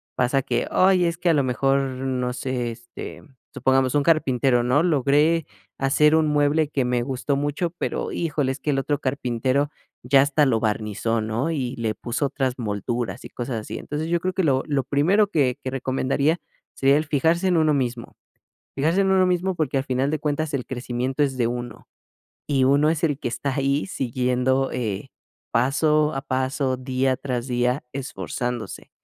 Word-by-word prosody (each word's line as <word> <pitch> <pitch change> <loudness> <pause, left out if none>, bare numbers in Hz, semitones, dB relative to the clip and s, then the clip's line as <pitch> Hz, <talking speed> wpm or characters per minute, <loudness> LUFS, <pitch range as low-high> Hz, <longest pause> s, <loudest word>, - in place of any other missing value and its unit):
pasa 130 +2 +2
que, 120 -2 -1
ay, 185 -1 +4
es 170 0 -1
que 175 0 0
a - - +5
lo 145 -3 +2
mejor, 135 +2 +1
no 130 -1 -2
sé, 125 -1 -2
este, 115 +1 -9 0.3
supongamos 130 0 +2
un 145 - +3
carpintero, 135 -6 +2
¿no? 125 +5 +3
Logré 150 +1 +3 0.3
hacer 150 +3 +3
un 160 -1 +3
mueble 150 +1 +2
que 140 -3 0
me 125 -1 0
gustó 135 +2 -2
mucho, 145 +4 -1
pero - - -2
híjole, 150 -5 -1
es 135 - -10
que 150 - -3
el 135 - +1
otro 145 +1 -1
carpintero 130 +1 0 0.3
ya 135 +2 +5
hasta 145 +2 +3
lo 120 -5 +2
barnizó, 110 +1 -1
¿no? 115 +8 -1
Y 130 -5 -2
le 110 -2 -1
puso 120 +6 -2
otras 135 -2 -1
molduras 110 -1 -3
y - - -8
cosas 120 -1 -4
así. - - -7
Entonces, 150 +2 -4
yo 170 0 +2
creo 185 +1 -1
que 190 - 0
lo 135 -3 +2
lo 140 -3 0
primero 170 +10 +3
que 140 -9 +1
que 130 - -2
recomendaría, 135 +4 0 0.4
sería 135 +1 +4
el 155 - +1
fijarse 160 +5 +1
en 180 -2 +3
uno 155 -1 +3
mismo. 125 -4 -2 0.6
Fijarse 160 +7 +2
en 195 0 +2
uno 190 -1 +4
mismo 180 +1 0
porque 155 -5 -1
al 135 - 0
final 130 +1 0
de 155 - -1
cuentas 150 +1 -2
el 135 -3 -2
crecimiento 130 +2 -2
es 135 -2 -1
de 120 - +2
uno, 120 -1 -6 0.6
y 135 -3 +2
uno 140 +3 +4
es 160 0 -1
el 145 -4 +1
que - - -3
está 125 +4 -3
ahí 140 +1 +1
siguiendo, 130 -1 0
eh, 110 0 -3 0.4
paso 150 +5 +2
a 135 - -3
paso, 130 0 -1
día 130 0 0
tras 125 -3 -3
día, 125 +2 0
esforzándose. 120 - -5
135 Hz, 185 wpm, -23 LUFS, 125-150 Hz, 0.6 s, a